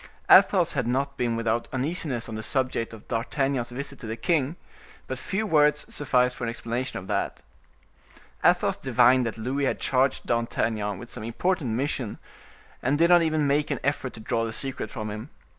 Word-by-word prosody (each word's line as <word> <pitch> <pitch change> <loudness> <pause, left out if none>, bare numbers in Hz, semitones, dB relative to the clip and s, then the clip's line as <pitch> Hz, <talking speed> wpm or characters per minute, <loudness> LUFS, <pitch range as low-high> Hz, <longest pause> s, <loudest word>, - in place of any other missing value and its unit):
Athos - - +6
had - - -1
not 135 +3 0
been 120 -2 0
without 115 0 0
uneasiness 135 -3 -2
on 115 - -7
the 110 - -4
subject 130 -1 -1
of 110 -2 -12
D'Artagnan's 130 +1 -1
visit 140 +2 -5
to 115 - -8
the 110 +1 -4
king; 155 -1 +1 0.5
but - - -5
few 205 +3 -2
words 150 -4 +3
sufficed 125 -3 +2
for - - -7
an 115 - 0
explanation 120 +2 -3
of 95 - -7
that. 105 - -2 1.0
Athos - - +3
divined 125 0 +4
that 115 - -5
Louis 130 +5 -1
had - - -1
charged 130 +1 +1
D'Artagnan 110 -3 -1
with 120 +5 -10
some - - -6
important 130 +2 -1
mission, 130 -3 -2 0.6
and 135 +4 +1
did 170 +2 +4
not 175 -1 +7
even 155 -2 +1
make 145 +1 +1
an - - -1
effort 135 -3 -1
to - - -10
draw 115 +1 -1
the 115 - -2
secret 135 +4 -2
from 110 -3 -5
him. 110 +6 -7
125 Hz, 185 wpm, -26 LUFS, 115-140 Hz, 1.0 s, not